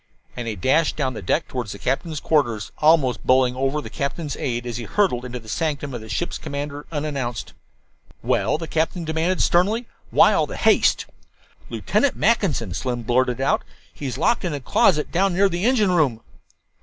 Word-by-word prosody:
And 120 -1 -5
he 110 - -2
dashed 135 - +2
down 135 -4 -1
the 110 - -6
deck 85 - 0
toward 125 -3 -4
the 100 - -6
captain's 150 - -2
quarters, 120 -11 0
almost 150 -7 +3
bowling 130 -1 +3
over 135 +3 0
the - - -8
captain's 145 +1 -3
aide 120 -1 -3
as 120 -2 -4
he 120 - -5
hurtled 175 -13 +1
into 125 0 -5
the 115 -2 -12
sanctum 145 0 -2
of 120 - -5
the 110 - -11
ship's 175 +11 -3
commander 145 0 -5
unannounced. 140 -7 -3 0.7
"Well?" - - +1
the 165 0 -6
captain 165 +2 -1
demanded 160 +4 0
sternly. 210 +7 +2 0.2
"Why - - +5
all - - +2
the - - -7
haste?" - - +3 0.6
"Lieutenant 285 - 0
Mackinson," 160 - +1
Slim 120 +3 -3
blurted 125 +1 +1
out; 135 - +1 0.3
"he's 135 -4 -5
locked 235 - +1
in 170 -5 -2
a - - -4
closet 150 +4 +2
down 190 +1 +1
near 200 +2 +4
the 175 +2 -2
engine 225 -6 +3
room." 140 -10 +2
145 Hz, 180 wpm, -22 LUFS, 125-165 Hz, 0.7 s, Why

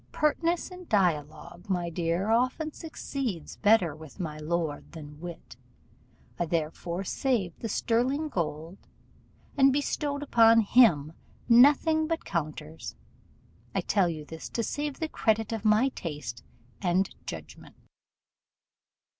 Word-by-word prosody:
Pertness 330 +4 0
in 365 -1 -10
dialogue, 175 0 -1
my 175 -2 -1
dear, 170 +5 0
often 255 +7 +1
succeeds 270 - -5
better 205 -7 +3
with 155 +3 -13
my 155 -4 -4
lord 160 -1 -3
than 150 -2 -10
wit: 170 -7 -9 0.8
I 175 - 0
therefore 170 +3 -2
saved 200 -5 -1
the 225 - -4
sterling 255 +9 +1
gold, 165 - -3 0.8
and 275 -1 +6
bestowed 285 +1 -1
upon 230 -4 +6
him 200 - +4 0.3
nothing 295 +6 +5
but 330 0 -2
counters. 155 -2 -4 0.8
I - - +2
tell 195 -4 +2
you 155 -2 -5
this 160 +1 -8
to 230 - -2
save 290 +3 -3
the 320 - -1
credit 225 -6 0
of 225 -2 -3
my 215 +5 +4
taste 150 - -6 0.4
and 185 0 +2 0.2
judgment. - - -9
200 Hz, 120 wpm, -28 LUFS, 165-265 Hz, 0.8 s, and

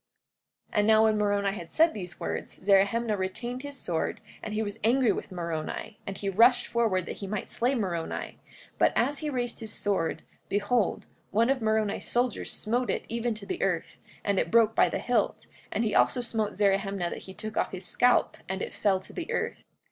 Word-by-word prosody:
44:12 - - -4
And 205 - +3
now 220 0 +6
when 220 -1 +3
Moroni 205 -1 +2
had 175 -4 -8
said 325 +1 +4
these 180 -5 -7
words, 80 0 -4
Zerahemnah 205 +3 +3
retained 240 +7 -3
his 285 0 -6
sword, 170 -9 -2 0.2
and 215 - -5
he 220 - +1
was 205 +1 -5
angry 245 +2 +4
with - - -4
Moroni, 170 +4 -4
and 195 -1 -4
he 200 - -4
rushed 230 +6 +5
forward 215 -6 +1
that - - -6
he 200 - -6
might 210 0 -3
slay 250 +3 +1
Moroni; 175 -8 -3 0.4
but - - +4
as 280 +4 +2
he 305 - -2
raised 245 -3 -2
his 220 -2 -4
sword, 200 -7 -1 0.3
behold, 205 +2 +1 0.2
one 230 +5 +3
of 270 -2 0
Moroni's 220 -2 0
soldiers 245 -1 0
smote 240 +3 -1
it - - -1
even 235 0 -1
to 210 -2 -8
the - - -4
earth, 175 -4 -1 0.2
and 200 -2 +1
it - - 0
broke 225 -1 +5
by - - +4
the - - -2
hilt; 235 -4 0 0.3
and 225 - 0
he 215 - 0
also 255 - +4
smote 225 -3 -1
Zerahemnah 195 -2 +1
that - - -5
he 190 - -9
took 215 0 -6
off - - 0
his 185 -1 -6
scalp 245 +6 +3
and 190 0 -2
it - - -5
fell 195 -2 +2
to - - -12
the 345 -2 -5
earth. - - -2
215 Hz, 205 wpm, -28 LUFS, 195-235 Hz, 0.4 s, now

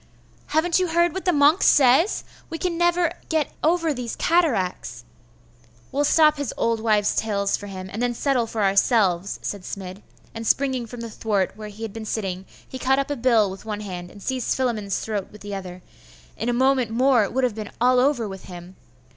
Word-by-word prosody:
'Haven't 335 +3 +2
you 365 - +1
heard 340 0 +2
what 380 - -5
the 360 - +4
monk 295 +3 +4
says? 280 - +4 0.3
we 325 - -4
can 355 0 -2
never 345 0 +2 0.2
get 315 -2 0
ever 330 -1 +2
those 245 -3 -5
cataracts.' 190 - 0 0.9
'We'll 290 +1 +1
stop 305 0 +4
his 285 -4 -3
old 230 -1 +1
wives' 215 -2 +2
tales 200 -2 0
for 205 - -8
him, 190 -1 -7
and 205 +4 -6
then 245 -1 0
settle 255 -3 +1
for 220 -2 -2
ourselves,' 195 -2 +2
said 205 - -4
Smid; 190 +1 -7 0.3
and 225 0 -5
springing 260 -3 +1
from 240 +1 -8
the 230 -1 -6
thwart 205 -4 -1
where 215 0 -8
he 210 +2 -10
had 220 -3 -5
been 225 -1 -7
sitting, 190 -4 -4 0.2
he 260 - -8
caught 265 +1 +2
up 275 +1 -1
a - - 0
bill 230 -6 +3
with 190 - -10
one 210 -1 -5
hand, 180 -3 -7
and 200 +1 -14
seized 260 -2 -1
Philammon's 220 -7 -1
throat 210 -3 -3
with 210 - -14
the 205 0 -7
other.... 185 -2 -7 0.5
in 230 - -3
a - - +3
moment 260 -1 +2
more, 245 0 +3
it 200 - -3
would 260 +1 0
have 250 -3 +1
been 215 -1 -6
all 250 +1 +4
over 255 -4 +2
with 195 -1 -9
him.... 180 +1 -10
230 Hz, 205 wpm, -23 LUFS, 200-275 Hz, 0.9 s, the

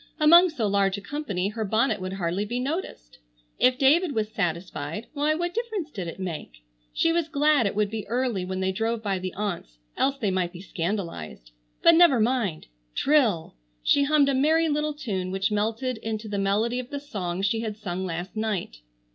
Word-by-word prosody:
Among 340 +4 +7
so 275 -9 -2
large 200 -1 +2
a - - -7
company 200 -6 -3
her 220 +1 -3
bonnet 220 0 +1
would 185 0 -4
hardly 185 +1 -1
be 240 +4 -3
noticed. 270 - -5 0.4
If 255 0 +4
David 295 +4 +4
was 215 -1 0
satisfied 170 0 -3
why 300 +1 +1
what 345 +2 -2
difference 440 -9 -3
did 190 -8 -5
it 165 - -7
make? 155 - -6 0.3
She 330 - +2
was 335 -1 0
glad 295 -5 +3
it 195 - -3
would 210 -1 +1
be 220 -2 -5
early 235 -4 -1
when 185 +1 -3
they 190 0 +1
drove 225 +3 -2
by 195 -3 -1
the 185 0 -4
aunts, 185 - -4 0.2
else 275 0 +1
they 210 -7 0
might 185 -1 -1
be 175 - -9
scandalized. 165 - -4 0.3
But 335 - +8
never 330 -7 +6
mind! 220 -8 0 0.3
Trill! 240 - +2 0.3
She 285 - +4
hummed 290 -1 +4
a - - +2
merry 315 +5 +3
little 300 0 -1
tune 195 -10 -3
which 195 +3 -1
melted 225 +4 -1
into 220 0 -4
the 205 -1 -2
melody 215 +5 +1
of 250 0 -6
the 285 - -4
song 190 -10 -4
she 210 +3 +1
had 220 -2 -4
sung 190 -3 -4
last 175 +1 -5
night. 210 - -2
215 Hz, 195 wpm, -26 LUFS, 190-280 Hz, 0.4 s, But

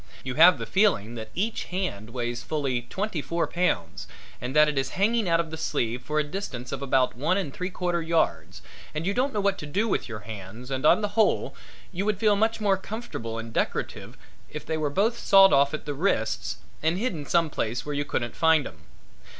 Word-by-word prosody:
You 130 - -3
have 170 +6 +7
the - - -5
feeling 185 - +2
that 110 -2 -7
each 215 +5 -1
hand 180 - -4
weighs 120 0 -3
fully 135 -5 -1
twenty 195 -3 -2
four 170 +3 -1
pounds 90 - -1 0.3
and 125 +4 -4
that 150 0 +7
it 150 - -1
is 135 -1 0
hanging 215 0 +2
out 165 0 +3
of 165 -2 -2
the 160 - -5
sleeve 125 -6 -1
for 150 +4 -3
a 150 - +3
distance 145 -7 -6
of 140 - -4
about 130 -2 +2
one 150 +9 +1
and 155 -9 -3
three 180 +1 -3
quarters 175 -3 -2
yards 165 -1 0 0.3
and 155 +2 -2
you 200 - +1
don't 260 +4 +1
know 210 - -2
what 200 -1 +1
to 150 - -6
do 205 +10 0
with 190 - -1
your 110 -2 -6
hands 110 +4 -9
and 135 +3 +1
on - - +5
the 205 - -1
whole 215 +1 +1 0.4
would 200 +3 0
feel 210 0 +3
much 220 +2 +1
more 200 -2 +2
comfortable 190 - -6
and 115 0 -7
decorative - - -3 0.3
if 150 - -7
they 160 - -2
were 155 -2 -1
both 210 +10 +1
sawed 195 -1 +6
off 140 0 +4
at 155 - -5
the 145 - -3
wrists 140 - -1 0.2
and 160 +3 +1
hidden 190 -9 -2
some 165 +1 +1
place 115 -1 -2
where 150 - -3
you 145 0 0
couldn't 120 -4 -3
find 160 -3 +4
'em. 80 -2 -11
155 Hz, 215 wpm, -26 LUFS, 125-195 Hz, 0.4 s, have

